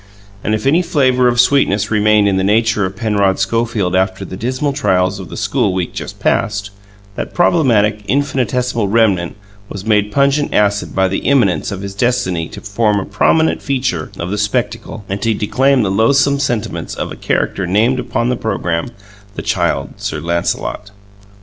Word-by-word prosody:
And 110 Hz, -, +1 dB
if 110 Hz, -, -5 dB
any 155 Hz, +6 st, +4 dB
flavour 130 Hz, -8 st, +2 dB
of 120 Hz, 0 st, +1 dB
sweetness 115 Hz, -6 st, +2 dB
remained 105 Hz, -1 st, +3 dB
in 95 Hz, -1 st, +1 dB
the 95 Hz, -, +1 dB
nature 105 Hz, 0 st, +2 dB
of 95 Hz, -, -9 dB
Penrod 100 Hz, -3 st, +1 dB
Schofield 105 Hz, -2 st, 0 dB
after 95 Hz, 0 st, 0 dB
the -, -, -7 dB
dismal 130 Hz, +7 st, -2 dB
trials 95 Hz, -7 st, +1 dB
of 90 Hz, -4 st, -8 dB
the -, -, -8 dB
school 90 Hz, -, 0 dB
week 90 Hz, -2 st, -2 dB
just -, -, -7 dB
past, 100 Hz, -3 st, 0 dB, 0.4 s
that -, -, -6 dB
problematic, 115 Hz, -12 st, +3 dB
infinitesimal 125 Hz, -4 st, 0 dB
remnant 100 Hz, -5 st, +1 dB, 0.3 s
was 100 Hz, 0 st, -7 dB
made 105 Hz, -1 st, +2 dB
pungent 140 Hz, +2 st, +1 dB
acid 105 Hz, 0 st, +1 dB
by 95 Hz, 0 st, +3 dB
the 95 Hz, -, -2 dB
imminence 125 Hz, -10 st, +1 dB
of 95 Hz, -1 st, -5 dB
his 100 Hz, -1 st, -6 dB
destiny 100 Hz, -7 st, 0 dB
to -, -, -10 dB
form 105 Hz, 0 st, 0 dB
a 95 Hz, -, -4 dB
prominent 160 Hz, 0 st, +2 dB
feature 130 Hz, -, -2 dB
of 85 Hz, +2 st, -4 dB
the 105 Hz, -, -2 dB
spectacle, 105 Hz, 0 st, -2 dB
and 95 Hz, +1 st, -4 dB
to 115 Hz, 0 st, +1 dB
declaim 130 Hz, +5 st, +2 dB
the 95 Hz, -, 0 dB
loathsome 140 Hz, +7 st, +3 dB
sentiments 120 Hz, -6 st, -2 dB
of -, -, -4 dB
a -, -, -6 dB
character 95 Hz, -2 st, -1 dB
named 115 Hz, +8 st, +2 dB
upon 120 Hz, -1 st, -1 dB
the 125 Hz, -, +1 dB
programme 85 Hz, -6 st, -2 dB, 0.5 s
the -, -, -5 dB
Child -, -, 0 dB
Sir 75 Hz, -, -4 dB
Lancelot. 85 Hz, +5 st, -2 dB
105 Hz, 175 wpm, -16 LUFS, 100-125 Hz, 0.5 s, any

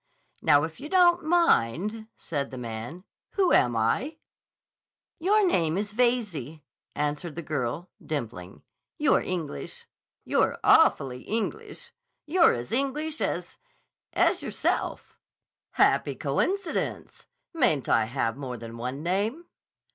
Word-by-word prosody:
"Now, 145 Hz, -3 st, +5 dB
if 160 Hz, 0 st, -5 dB
you 295 Hz, -, -7 dB
don't 350 Hz, -1 st, +5 dB
mind," 220 Hz, -, +2 dB
said 140 Hz, -4 st, -3 dB
the 130 Hz, -, -8 dB
man. 120 Hz, +8 st, -6 dB, 0.3 s
"Who 380 Hz, -3 st, +3 dB
am 120 Hz, -1 st, +4 dB
I?" 180 Hz, -, 0 dB, 1.0 s
"Your 405 Hz, +5 st, +3 dB
name 170 Hz, -, +1 dB
is 205 Hz, +1 st, -3 dB
Veyze," 210 Hz, -, 0 dB, 0.4 s
answered 150 Hz, +2 st, -2 dB
the 170 Hz, -, -5 dB
girl, 145 Hz, +3 st, -3 dB
dimpling. 115 Hz, -, -6 dB, 0.3 s
"You're -, -, +3 dB
English. 165 Hz, -, -5 dB, 0.4 s
You're -, -, +1 dB
awfully 130 Hz, -2 st, +4 dB
English! 400 Hz, -, -4 dB, 0.3 s
You're 335 Hz, +3 st, +4 dB
as 120 Hz, 0 st, -6 dB
English 290 Hz, +5 st, -1 dB
as—as -, -, -2 dB
yourself." -, -, -2 dB, 0.5 s
"Happy -, -, +3 dB
coincidence! 390 Hz, -3 st, -2 dB, 0.3 s
Mayn't 245 Hz, -, +1 dB
I 110 Hz, -, +3 dB
have 115 Hz, -1 st, -1 dB
more 130 Hz, -3 st, -6 dB
than 115 Hz, 0 st, -9 dB
one 125 Hz, +5 st, -5 dB
name?" 210 Hz, -, -1 dB
170 Hz, 115 wpm, -27 LUFS, -, 1.0 s, Now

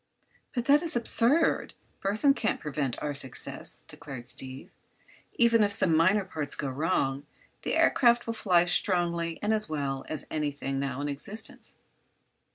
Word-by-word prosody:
"But 240 Hz, -1 st, -1 dB
that 290 Hz, +2 st, +5 dB
is 335 Hz, -5 st, -2 dB
absurd! 240 Hz, +6 st, +2 dB, 0.3 s
Burthon 215 Hz, +8 st, +2 dB
can't 220 Hz, -, -1 dB
prevent 140 Hz, -4 st, -3 dB
our 150 Hz, -1 st, -2 dB
success," 135 Hz, -3 st, -2 dB
declared 120 Hz, -3 st, -8 dB
Steve. 130 Hz, 0 st, -5 dB, 0.6 s
"Even 230 Hz, -2 st, +4 dB
if 205 Hz, -, +1 dB
some 185 Hz, -6 st, +3 dB
minor 185 Hz, +5 st, +3 dB
parts 155 Hz, -6 st, -4 dB
go 140 Hz, -, -3 dB
wrong, 140 Hz, -1 st, -1 dB, 0.3 s
the -, -, -2 dB
aircraft 240 Hz, -1 st, +4 dB
will 230 Hz, -, -2 dB
fly 180 Hz, -6 st, +3 dB
as 175 Hz, -, -1 dB
strongly 170 Hz, -3 st, +1 dB
and 210 Hz, +1 st, +2 dB
as 215 Hz, -5 st, -1 dB
well 140 Hz, -3 st, -3 dB
as 155 Hz, -, -3 dB
anything 145 Hz, -3 st, -2 dB
now 140 Hz, -1 st, -3 dB
in 145 Hz, -, -2 dB
existence." 195 Hz, +10 st, -3 dB
170 Hz, 155 wpm, -28 LUFS, 140-220 Hz, 0.6 s, that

